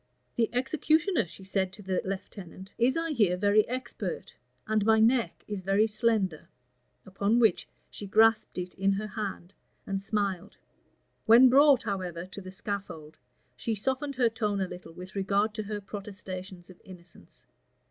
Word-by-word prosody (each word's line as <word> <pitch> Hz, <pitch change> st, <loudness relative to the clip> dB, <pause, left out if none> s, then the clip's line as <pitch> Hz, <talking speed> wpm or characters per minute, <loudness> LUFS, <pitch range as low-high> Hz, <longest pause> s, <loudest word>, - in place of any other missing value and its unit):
"The 230 Hz, -1 st, +1 dB
executioner," 310 Hz, -, +1 dB
she 190 Hz, -, -13 dB
said 190 Hz, -1 st, -1 dB
to 205 Hz, -, -10 dB
the 190 Hz, -1 st, -1 dB
lieutenant, 190 Hz, 0 st, -7 dB
"is, 255 Hz, +5 st, +3 dB
I 330 Hz, 0 st, -1 dB
hear, 205 Hz, -10 st, +2 dB
very 205 Hz, +2 st, +3 dB
expert; 255 Hz, -, -5 dB, 0.3 s
and 215 Hz, -1 st, +1 dB
my 220 Hz, +1 st, +4 dB
neck 235 Hz, +2 st, +2 dB
is 205 Hz, -2 st, -4 dB
very 195 Hz, +3 st, +3 dB
slender:" 215 Hz, -6 st, 0 dB, 0.6 s
upon 200 Hz, +4 st, 0 dB
which 225 Hz, -7 st, +3 dB, 0.2 s
she 205 Hz, -, -7 dB
grasped 225 Hz, +2 st, +3 dB
it 180 Hz, 0 st, -4 dB
in 195 Hz, +1 st, +1 dB
her 205 Hz, +2 st, -3 dB
hand, 200 Hz, -3 st, -5 dB, 0.3 s
and 195 Hz, 0 st, -2 dB
smiled. 200 Hz, -2 st, -2 dB, 0.7 s
When 240 Hz, +3 st, +8 dB
brought, 275 Hz, 0 st, +6 dB
however, 180 Hz, -4 st, -4 dB
to 190 Hz, +2 st, -9 dB
the 185 Hz, -, -9 dB
scaffold, 185 Hz, -6 st, -6 dB, 0.4 s
she 225 Hz, -, -2 dB
softened 265 Hz, +6 st, -2 dB
her 250 Hz, -2 st, +3 dB
tone 210 Hz, -3 st, -1 dB
a 190 Hz, -, 0 dB
little 180 Hz, -2 st, -10 dB
with 180 Hz, +2 st, -10 dB
regard 200 Hz, +2 st, +1 dB
to 215 Hz, -, -3 dB
her 210 Hz, 0 st, -4 dB
protestations 190 Hz, -3 st, -8 dB
of 180 Hz, -, -18 dB
innocence. 175 Hz, -, -15 dB
205 Hz, 155 wpm, -28 LUFS, 190-225 Hz, 0.7 s, When